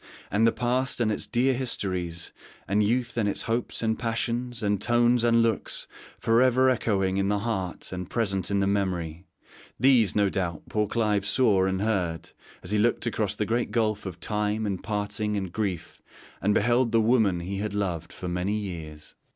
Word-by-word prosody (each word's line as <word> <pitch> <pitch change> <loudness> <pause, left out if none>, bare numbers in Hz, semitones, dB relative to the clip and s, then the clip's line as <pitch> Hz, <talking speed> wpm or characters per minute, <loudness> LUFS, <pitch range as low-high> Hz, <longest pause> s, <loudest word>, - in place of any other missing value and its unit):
'And 110 +3 +4
the - - +4
past 125 +3 -1
and 110 -2 +2
its 105 - -3
dear 125 +2 +2
histories, 90 -9 -3 0.3
and 100 +2 +2
youth 120 +3 0
and 105 -3 +2
its - - -2
hopes 115 +1 -2
and 110 0 0
passions, 120 +1 -2
and 100 -1 +1
tones 120 +1 +3
and 115 -1 +4
looks 115 -3 -2 0.3
for 115 +1 +3
ever 130 +1 +4
echoing 95 -6 0
in 100 0 +1
the 105 - +2
heart 100 -5 -3
and 90 -1 -5
present 100 -6 -1
in 100 -1 +1
the - - +2
memory 90 -4 -2 0.5
these, 125 -6 +4
no 100 -1 +3
doubt, 90 -4 -2
poor 105 -1 0
Clive 105 -3 +1
saw 105 -8 +3
and 95 +1 0
heard 90 -7 -1 0.3
as 90 - -5
he 105 - +2
looked 120 +3 +2
across 105 -3 -1
the 105 - -1
great 120 +3 0
gulf 110 -3 0
of 90 -2 -7
time, 105 +3 -1
and 100 -3 -2
parting 105 0 -2
and 95 -3 -3
grief, 95 -6 -3 0.4
and 105 +2 +2
beheld 120 +2 +2
the 115 - +4
wonmn 110 -6 +2
he 95 +3 -4
had 105 0 -3
loved 90 -5 -2
for 90 - -7
many 90 +4 -1
years.' 80 -7 -7
105 Hz, 185 wpm, -26 LUFS, 95-115 Hz, 0.5 s, And